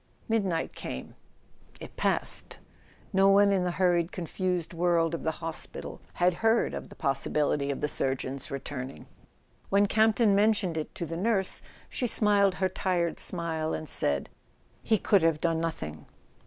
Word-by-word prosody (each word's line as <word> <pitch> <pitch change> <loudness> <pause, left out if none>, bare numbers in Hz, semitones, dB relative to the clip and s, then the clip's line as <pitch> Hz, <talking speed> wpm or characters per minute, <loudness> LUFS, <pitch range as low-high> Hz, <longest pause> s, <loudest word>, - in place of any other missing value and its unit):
Midnight 195 -7 0
came. 65 - -6 0.7
It - - -10
passed. - - -1 0.6
No 195 +1 +5
one 200 +1 +5
in 190 -2 +2
the 180 - 0
hurried 175 -2 +2
con¬ 175 -3 -5
fused 180 -2 -2
world 170 -1 +2
of 165 - -3
the - - 0 0.2
hospital 165 -1 -6
had 180 +1 +2
heard 225 +1 +3
of - - -6
the - - -13
possibility 140 0 0
of 140 - -3
the 150 - +1
surgeon's 135 0 -3
returning. 135 -1 -6 0.6
When 200 +1 +4
Campton 220 +1 +3
mentioned 205 -4 +2
it 155 -1 -4
to 170 - -3
the 165 +1 -5
nurse 195 0 +1 0.3
she 250 - -2
smiled 205 -4 +3
her 190 - +1
tired 180 -2 -1
smile, 160 -3 0
and 155 - -6
said: 70 - 0 0.5
"He 220 - +2
could 200 0 +3
have 165 -2 +2
done 165 0 +1
nothing." 75 - -5
175 Hz, 155 wpm, -28 LUFS, 155-195 Hz, 0.7 s, No